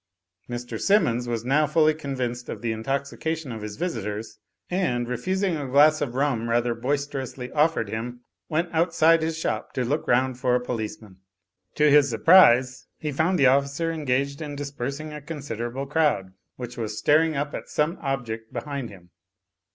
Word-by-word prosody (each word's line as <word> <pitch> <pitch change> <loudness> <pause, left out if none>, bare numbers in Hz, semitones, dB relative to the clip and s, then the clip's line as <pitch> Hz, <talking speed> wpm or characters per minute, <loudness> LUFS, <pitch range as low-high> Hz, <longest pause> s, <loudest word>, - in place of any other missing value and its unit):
Mr. 120 0 -5
Simmons 125 - +2
was 115 -1 -3
now 150 +4 +3
fully 155 +1 +4
convinced 130 -5 -4
of - - -6
the 115 - 0
intoxication 140 +5 -3
of 110 -2 -6
his 105 -1 -6
visitors, 110 - -4 0.3
and 125 -10 -1
refusing 185 - -1
a 145 -3 -4
glass 150 +4 +5
of 130 -4 -2
rum 130 -4 0
rather 120 0 +1
boisterously 135 0 -3
offered 155 -6 +2
him, 120 +3 -5 0.3
went 165 +3 0
outside 165 0 +4
his 160 0 -2
shop 165 - -3
to 125 - -1
look 145 +6 -1
round 130 +1 +2
for 125 -1 +2
a - - +3
policeman. 110 -5 -6 0.6
To 150 - +4
his 145 -1 +6
surprise 130 - +5
he 150 - -4
found 160 +6 +1
the 140 - +2
oflScer 140 +5 +2
engaged 140 -1 -1
in 145 -2 -5
dispersing 140 +1 -5
a 150 - -7
con 155 +2 -6
siderable 130 0 -4
crowd, 145 -11 +1 0.2
which 125 -1 -8
was 110 -2 -4
staring 155 +5 +3
up 145 +1 -2
at - - -6
some 155 +4 0
object 120 -5 -4
behind 140 -4 -4
him. 90 -3 -15
135 Hz, 165 wpm, -25 LUFS, 120-155 Hz, 0.6 s, his